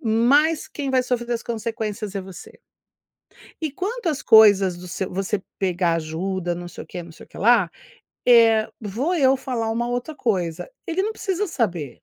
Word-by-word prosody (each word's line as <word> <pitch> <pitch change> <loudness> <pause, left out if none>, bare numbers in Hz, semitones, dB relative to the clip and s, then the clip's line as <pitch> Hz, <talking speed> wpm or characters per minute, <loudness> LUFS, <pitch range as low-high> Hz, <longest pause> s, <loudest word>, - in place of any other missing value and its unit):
mais 275 +8 +3
quem 280 -2 -4
vai 260 -1 +3
sofrer 245 -1 -2
as 235 - -2
consequências 220 -3 -4
é 200 - -2
você. 190 -1 -12 1.0
E 315 - -1
quanto 405 - -4
às 300 -4 -1
coisas 200 -5 +6
do 180 +1 -10
seu 185 +1 -4
você 195 +1 -1 0.2
pegar 180 -3 +1
ajuda 175 +3 -3
não 175 0 -7
sei - - -9
o - - -32
quê, 175 - -7
não 170 - -12
sei 160 - -14
o - - -32
que - - -13
lá, 215 -4 +4 0.6
eh, 225 -3 +5
vou 235 - -2
eu 270 -4 +4
falar 245 -4 -3
uma 235 +2 -1
outra 245 +6 -3
coisa, 185 - -2 0.2
ele 345 +2 0
não 425 +3 -1
precisa 405 -2 -2
saber. 180 - -2
225 Hz, 185 wpm, -23 LUFS, 185-265 Hz, 1.0 s, coisas